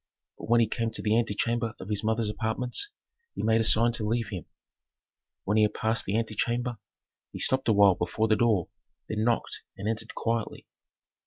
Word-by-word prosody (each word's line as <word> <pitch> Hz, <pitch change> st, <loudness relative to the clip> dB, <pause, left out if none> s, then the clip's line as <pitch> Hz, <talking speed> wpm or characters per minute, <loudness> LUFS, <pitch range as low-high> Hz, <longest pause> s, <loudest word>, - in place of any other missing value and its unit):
But -, -, -8 dB
when 120 Hz, 0 st, +5 dB
he 115 Hz, -, +3 dB
came 115 Hz, +1 st, -1 dB
to -, -, -3 dB
the 105 Hz, 0 st, +2 dB
antechamber 115 Hz, 0 st, 0 dB
of 95 Hz, -, -8 dB
his 105 Hz, 0 st, 0 dB
mother's 110 Hz, 0 st, +1 dB
apartments, 120 Hz, -, -1 dB, 0.5 s
he -, -, -4 dB
made 110 Hz, 0 st, +3 dB
a -, -, +2 dB
sign 115 Hz, +2 st, +4 dB
to 115 Hz, -2 st, -1 dB
leave 115 Hz, +1 st, -1 dB
him. 90 Hz, -6 st, -6 dB, 1.0 s
When 105 Hz, +2 st, +1 dB
he -, -, +5 dB
had 105 Hz, 0 st, +1 dB
passed 110 Hz, +1 st, 0 dB
the 100 Hz, +3 st, 0 dB
antechamber, 120 Hz, +2 st, -1 dB, 0.5 s
he -, -, -7 dB
stopped 130 Hz, -1 st, 0 dB
a -, -, +5 dB
while 100 Hz, -2 st, +6 dB
before 90 Hz, +6 st, -1 dB
the 110 Hz, -, +4 dB
door, 110 Hz, -7 st, +2 dB, 0.4 s
then 110 Hz, 0 st, -2 dB
knocked 115 Hz, 0 st, 0 dB, 0.2 s
and 100 Hz, -, -4 dB
entered 110 Hz, 0 st, -3 dB
quietly. 115 Hz, -1 st, -2 dB
110 Hz, 190 wpm, -28 LUFS, 105-115 Hz, 1.0 s, while